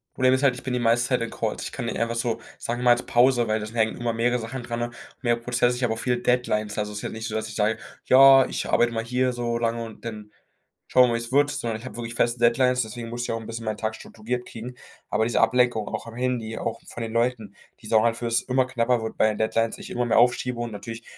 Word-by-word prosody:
Problem 130 0 +4
ist 130 +2 +1
halt, 135 -3 +4
ich 125 - -10
bin 130 - -3
die 125 - 0
meiste 120 +1 +2
Zeit 125 -2 +1
in 115 - -2
Calls. 110 -1 -3
Ich - - -5
kann 125 - -5
nicht 115 - -3
einfach 115 0 -1
so, 115 -1 -1 0.2
sagen 120 +1 -3
wir - - -3
mal, 120 - +7
jetzt 120 +1 +2
Pause, 120 -1 +3
weil 110 0 +1
da 105 - -5
hängen 110 -1 +1
immer 120 -1 -1
mehrere 120 +2 +1
Sachen 120 +3 -6
dran, 120 0 -3 0.3
mehrere 120 -2 +1
Prozesse. 120 0 +1
Ich 125 - -4
habe 115 -2 +2
auch 110 - -6
viele 125 0 0
Deadlines. 120 -4 0
Also, 105 0 -2
es 105 - -5
ist - - -7
jetzt - - -3
nicht 110 +1 -5
so, 110 - -4
dass 110 0 -2
ich - - -9
sage: 110 +1 +1 0.3
„Ja, 135 0 +8
ich - - -3
arbeite 120 0 +3
mal 115 -1 -2
hier 125 +2 0
so 120 -1 -2
lange 115 0 -1
und 115 0 -11
dann 105 -2 -7 0.6
schauen 130 - +6
wir - - +1
mal, - - 0
wie - - 0
es 115 +1 -7
wird“, 145 +2 +3
sondern 115 -5 -3
ich 115 - -12
habe 130 - -8
wirklich 115 -1 -6
feste 120 0 +1
Deadlines. 125 +2 +3
Deswegen 115 +1 -7
muss 120 +1 -4
ich - - -3
auch 115 - -2
'n - - -10
bisschen 115 0 -6
meinen 110 -1 -2
Tag 110 0 -2
strukturiert 125 +3 -5
kriegen. 120 +2 -8 0.3
Aber 105 - +1
diese 120 - 0
Ablenkung 125 -4 +2
auch - - -5
am 115 - -9
Handy, 120 -3 -2
auch 115 - -4
von 120 - -6
den 110 -1 -5
Leuten, 115 -3 -1 0.3
die 110 - -10
sorgen 110 +1 +4
dafür, 115 +1 -2
dass 115 +1 +1
es 130 0 +2
knapper 120 -2 +1
wird 110 - -5
bei - - +4
den 105 - -3
Deadlines, 115 +1 0
ich - - -9
immer 120 0 -1
mehr 120 - +2
aufschiebe 125 0 +2
und 120 -1 -3
natürlich 115 +3 -7
120 Hz, 285 wpm, -25 LUFS, 115-125 Hz, 0.6 s, Ja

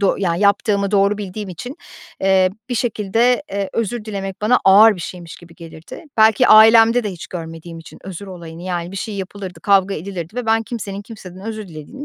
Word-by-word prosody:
doğ 200 - +2
Yani 175 -2 -1
yaptığımı 200 0 +2
doğru 200 0 +2
bildiğim 205 0 -6
için, 245 - -8 0.4
eee, 190 -1 +3 0.2
bir 250 - -2
şekilde, 235 +3 +1
eee, 200 -1 -3
özür 230 0 -3
dilemek 195 -3 -6
bana 245 +4 +4
ağır 210 +3 +7
bir 175 - -8
şeymiş 170 -1 -8
gibi 170 -1 -16
gelirdi. 165 - -12
Belki 220 +3 +4
ailemde 225 +2 +7
de 205 - -2
hiç 175 - -9
görmediğim 165 -1 -8
için 165 - -13
özür 190 +1 -8
olayını. 170 -3 -10
Yani, 175 -1 -4
bir - - -7
şey 210 +2 -5
yapılırdı, 190 -1 -7
kavga 195 -1 +2
edilirdi 175 +2 -7
ve 250 - -3
ben 225 0 +2
kimsenin 205 -3 -6
kimseden 190 -4 -12
özür 215 -3 -6
dilediğini 160 - -10
200 Hz, 190 wpm, -19 LUFS, 180-220 Hz, 0.4 s, ağır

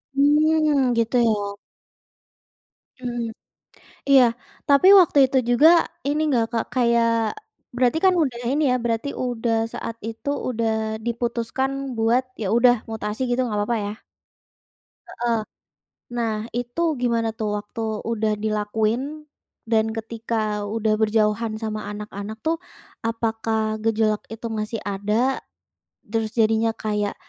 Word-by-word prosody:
Hmm, 295 -2 +3
gitu 230 +2 +1
ya. 205 -3 0 1.5
Mhm, 240 -2 -4 0.8
iya. 275 -2 +7 0.5
Tapi 280 +6 +5
waktu 325 -5 +3
itu 265 - +3
juga 265 +7 +6 0.4
ini 295 +2 0
nggak, 245 -5 +2
Kak, 230 -1 0
kayak, 235 -2 +3 0.7
berarti 250 +4 +2
kan 375 - +6
udah 245 -5 -2
ini 300 +2 +1
ya 250 - +3
berarti 230 +3 -1 0.2
udah 235 -2 -1 0.2
saat 230 - -5
itu 225 +4 -7 0.2
udah 230 -2 0 0.4
diputuskan 235 +2 -1 0.3
buat 230 +3 +2 0.2
ya 215 - -2
udah 245 0 +6 0.2
mutasi 215 0 -4
gitu 245 - +1
gak 210 - -2
apa-apa 205 +3 0
ya? 205 - -3 1.2
Heeh. 235 -1 -1 0.8
Nah 230 -2 0 0.2
itu 245 +6 -3 0.2
gimana 230 -2 +1
tuh 215 -2 -2
waktu 225 +2 -8 0.3
udah 220 -1 0
dilakuin, 220 +8 -1 0.4
dan 220 -1 +3
ketika 220 -2 -3
udah 215 +1 0
berjauhan 215 0 +1
sama 215 -1 -4
anak-anak 210 +1 -7
tuh, 325 +1 +1 0.5
apakah 225 -1 -1
gejolak 220 -1 +1
itu 225 +1 -8
masih 215 +1 -3
ada? 200 +1 -3 1.0
Terus 220 -1 -1
jadinya 225 0 +3
kayak, 210 -1 -2
230 Hz, 120 wpm, -23 LUFS, 215-245 Hz, 1.5 s, iya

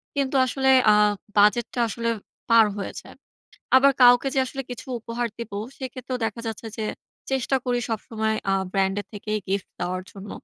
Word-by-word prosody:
কিন্তু 275 -1 0
আসলে 265 +1 0 0.2
আ - - +6 0.4
বাজেটটা 210 +4 +3
আসলে 230 +2 -2 0.4
পার 230 -1 +7
হয়ে 200 - -4
যায়। - - -15 0.6
আবার 275 +1 +6
কাউকে 245 +2 +7
যে - - +1
আসলে 270 +1 -5
কিছু 245 - -7
উপহার 235 +1 -3
দিবো, 215 -4 -5 0.2
সেক্ষেত্রেও 255 -1 -5
দেখা 220 +1 -3
যাচ্ছে 225 0 -5
যে 220 - -3 0.5
চেষ্টা 265 0 +1
করি 245 -1 0
সবসময় 220 0 -2 0.2
আ - - +3 0.2
ব্র্যান্ড 195 0 +1
এর - - -10
থেকেই 215 +1 -3
গিফট 195 0 0 0.2
দেওয়ার 180 +1 -2
জন্য। 200 0 -10
230 Hz, 165 wpm, -24 LUFS, 205-250 Hz, 0.6 s, পার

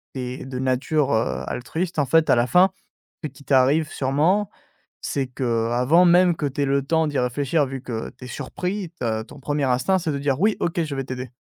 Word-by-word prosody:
tu 130 - -3
es 125 +1 -6
de 130 -1 -5
nature, 135 +3 0
heu, 110 +1 0
altruiste, 165 +7 -3
en 145 - +2
fait, 160 +4 +3
à - - +6
la 120 +1 +2
fin, 180 +6 +5 0.5
que - - -1
qui 140 0 -16
t'arrive 140 +4 +3
sûrement, 160 +9 +1 0.5
c'est 135 -1 -2
que, 115 -3 -1
avant 135 +9 +4
même 175 0 +5
que - - -4
tu 140 +1 -4
aies - - +3
le 140 0 +1
temps 160 +3 +1
d'y 145 -2 -2
réfléchir, 140 +5 +1
vu 135 0 -6
que 115 -4 -5
tu - - -11
es - - -9
surpris, 185 - -4
ta 110 -2 -1
ton 135 - -14
1er 145 +1 -1
instinct 130 +9 +2
c'est 165 -3 -2
de 140 - -2
dire: 140 0 -1
«Oui, 210 +2 +3
OK, 170 0 0
je 155 -3 -4
vais 135 0 -3
t'aider» 130 -1 -6
140 Hz, 225 wpm, -23 LUFS, 130-160 Hz, 0.5 s, à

